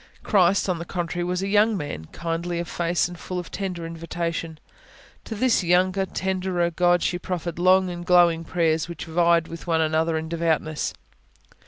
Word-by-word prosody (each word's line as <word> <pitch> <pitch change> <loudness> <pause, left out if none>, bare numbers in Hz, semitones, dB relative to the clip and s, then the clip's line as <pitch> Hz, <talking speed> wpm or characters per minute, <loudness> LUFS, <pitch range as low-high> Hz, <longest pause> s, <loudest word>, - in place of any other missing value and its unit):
Christ, 195 -1 +3
on 180 -3 -1
the - - -4
contrary, 175 0 -3
was 180 +1 -1
a - - -1
young 210 +1 +3
man, 145 - -5
kindly 170 - -3
of 170 0 -3
face, 175 0 0
and 175 - -9
full 185 - -5
of 175 -1 -5
tender 185 -4 -4
invitation. 165 -1 -4 0.7
To 220 - -5
this 245 -2 +2
younger, 185 +2 +2
tenderer 185 -2 -1
God, 175 +1 +2
she 175 - 0
proffered 175 -2 -4
long 185 +1 +4
and 175 0 -6
glowing 175 -2 +4
prayers, 165 -1 0
which 170 -2 -6
vied 170 0 +2
with 165 +1 -9
one 165 -1 +2
another 160 +1 +1
in 160 0 -4
devoutness. 160 -2 -1
175 Hz, 175 wpm, -24 LUFS, 165-180 Hz, 0.7 s, long